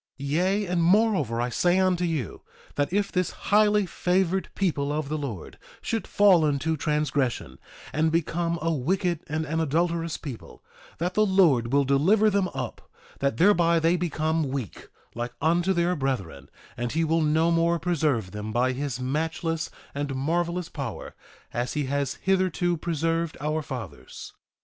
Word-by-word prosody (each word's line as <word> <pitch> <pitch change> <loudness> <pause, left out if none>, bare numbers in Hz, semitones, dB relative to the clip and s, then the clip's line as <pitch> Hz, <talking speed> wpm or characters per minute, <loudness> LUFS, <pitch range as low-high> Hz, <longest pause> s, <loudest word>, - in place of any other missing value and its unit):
1:13 140 +1 -4
Yea, 190 +6 +1
and 175 -2 0
moreover 180 - +3
I 120 +1 0
say 175 +8 +2
unto 185 -2 +2
you, 155 - -3 0.3
that 145 +2 -1
if 200 +1 0
this 180 -1 0
highly 210 -1 +2
favored 185 +1 0
people 145 -7 0
of 150 -1 -2
the 155 - -1
Lord 120 - -6 0.2
should 225 -1 -3
fall 195 -5 +5
into 150 +2 0
transgression, 150 -4 -1 0.3
and 155 +2 +2
become 170 +1 0
a 165 0 +1
wicked 175 +4 0
and 160 +1 -1
an 160 +1 -2
adulterous 165 +1 0
people, 135 -7 -9 0.3
that 175 +2 -2
the 215 - +3
Lord 165 - +3
will 140 +1 +4
deliver 185 +11 +3
them 195 -2 +1
up, - - -6 0.3
that 140 -5 0
thereby 170 -2 +4
they 165 +2 +3
become 160 -3 -1
weak 130 - -5 0.3
like 120 +1 -4
unto 170 +5 +2
their 175 0 +1
brethren; 95 - -3 0.3
and 120 0 -3
he 165 +1 +1
will 165 +1 +1
no 160 +2 +2
more 170 0 +2
preserve 150 - 0
them 105 +1 -5
by 125 +3 +2
his 130 -1 -3
matchless 160 +4 -2 0.2
and 140 -1 -3
marvelous 170 +5 -1
power, - - -6 0.4
as 120 +1 -2
he 150 - -1
has 140 0 -1
hitherto 185 -2 +1
preserved 165 0 -1
our 155 +2 -1
fathers. 125 - -8
160 Hz, 160 wpm, -26 LUFS, 140-175 Hz, 0.4 s, fall